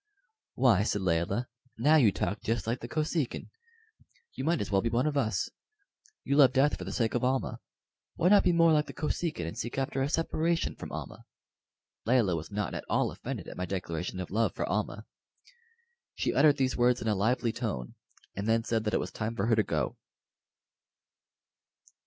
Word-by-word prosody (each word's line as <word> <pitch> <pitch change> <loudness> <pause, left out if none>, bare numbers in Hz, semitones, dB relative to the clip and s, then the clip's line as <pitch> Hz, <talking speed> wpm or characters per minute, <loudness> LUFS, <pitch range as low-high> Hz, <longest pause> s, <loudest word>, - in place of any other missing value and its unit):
"Why," 120 -7 +4
said 105 -1 -1
Layelah, 90 +7 0 0.3
"now 145 +7 +4
you 120 -9 +5
talk 100 - -2
just 115 -2 -1
like 115 +2 -1
the 120 - -7
Kosekin. 155 0 -2 0.8
You - - -5
might 165 +2 +1
as 100 - -3
well 95 -1 +3
be 115 - 0
one 120 +4 +1
of 150 -1 0
us. 110 -9 0 0.8
You 140 - 0
love 135 -4 +7
death 140 +2 +3
for 90 - -8
the 95 - -5
sake 115 +1 0
of 120 - 0
Almah. 130 +1 0 0.6
Why 175 - +3
not 205 0 +6
be - - +4
more 165 -1 +5
like 150 -1 +2
the - - -8
Kosekin, 150 - -2
and 85 - -5
seek 120 - -5
after 135 0 -1
a 135 - 0
separation 165 +1 0
from - - -8
Almah?" - - -7 0.8
Layelah 115 -8 +3
was 80 -1 -5
not 105 0 -3
at - - -4
all - - +1
offended - - -6
at - - -9
my 90 0 -3
declaration 90 -1 -4
of 90 - -5
love 115 +3 +1
for - - -1
Almah. - - -2 1.1
She - - -1
uttered 150 -2 +5
these 130 -1 +1
words 125 0 +3
in 115 - -4
a 110 - +3
lively 115 +4 +1
tone, 60 - -4 0.4
and 100 +2 -3
then 115 0 +2
said 115 -1 -1
that 105 - 0
it - - +2
was - - -4
time 110 +1 -3
for 100 - 0
her 115 0 +3
to 110 - +4
go. 75 -9 -2
115 Hz, 195 wpm, -29 LUFS, 100-140 Hz, 1.1 s, love